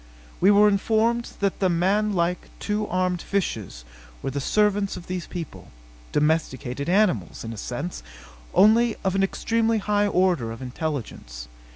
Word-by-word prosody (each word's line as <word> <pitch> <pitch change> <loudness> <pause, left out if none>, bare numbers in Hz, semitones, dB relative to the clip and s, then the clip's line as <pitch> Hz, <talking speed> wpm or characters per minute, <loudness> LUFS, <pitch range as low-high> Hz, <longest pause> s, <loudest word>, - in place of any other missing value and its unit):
We 190 - +5
were 205 +1 +6
informed 225 +3 +1
that 200 -1 0
the 190 - +2
manlike, 180 0 +1
two 210 0 -2
armed 180 -1 0
fishes 105 - -3 0.4
were 135 - -2
the 140 +1 -3
servants 205 +3 +1
of 175 - -9
these 180 -1 -4
people 170 -5 -7 0.4
domesticated 145 -3 0
animals, 180 - +1
in 115 0 -5
a - - -9
sense, 145 - -5 0.5
only 225 +2 +5
of 190 - +1
an 195 - +1
extremely 225 +3 +1
high 205 0 +1
order 180 - +1
of 115 - -8
intelligence. 125 - -5
185 Hz, 145 wpm, -24 LUFS, 145-205 Hz, 0.5 s, were